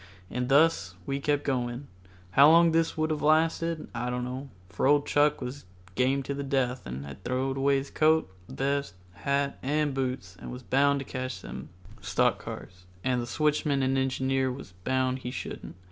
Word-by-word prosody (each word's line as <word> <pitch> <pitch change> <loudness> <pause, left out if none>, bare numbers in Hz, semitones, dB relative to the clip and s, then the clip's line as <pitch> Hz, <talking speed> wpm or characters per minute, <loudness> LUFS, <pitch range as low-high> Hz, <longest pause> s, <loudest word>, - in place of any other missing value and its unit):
And 125 0 -2
thus 135 - +3
we 140 0 -2
kept 145 0 0
on. 125 0 -2 0.4
How 140 +8 +7
long 170 +1 +6
this 165 0 +1
would 155 0 +1
have 150 - -1
lasted 160 +1 +2
I 120 +1 -2
don't 125 0 -2
know, 130 +3 -5 0.2
for 90 +8 0
old 145 0 +4
Chuck 145 0 +3
was 125 -2 -6 0.3
game 130 +5 +1
to 140 - -3
the 140 - -4
death 130 - -1
and 65 +3 -5
had 70 +7 -10
throwed 130 +1 -1
away 140 +1 +3
his 135 +1 -5
coat, 160 -3 +3 0.2
vest, 140 -5 -1 0.2
hat 140 +7 -1
and 145 +1 0
boots 125 -9 -3
and - - -8
was 125 +1 -8
bound 140 +2 +3
to - - -7
catch 130 -1 -5
them - - -8 0.3
stock 100 +1 +1
cars, 90 0 -9 0.2
and 125 -1 +1
the 120 - -5
switchman 150 0 +1
and 130 +1 +1
engineer 130 0 +1
was 125 -6 -8
bound 130 +2 +1
he 125 - -5
shouldn't. - - -6
135 Hz, 185 wpm, -28 LUFS, 125-145 Hz, 0.4 s, How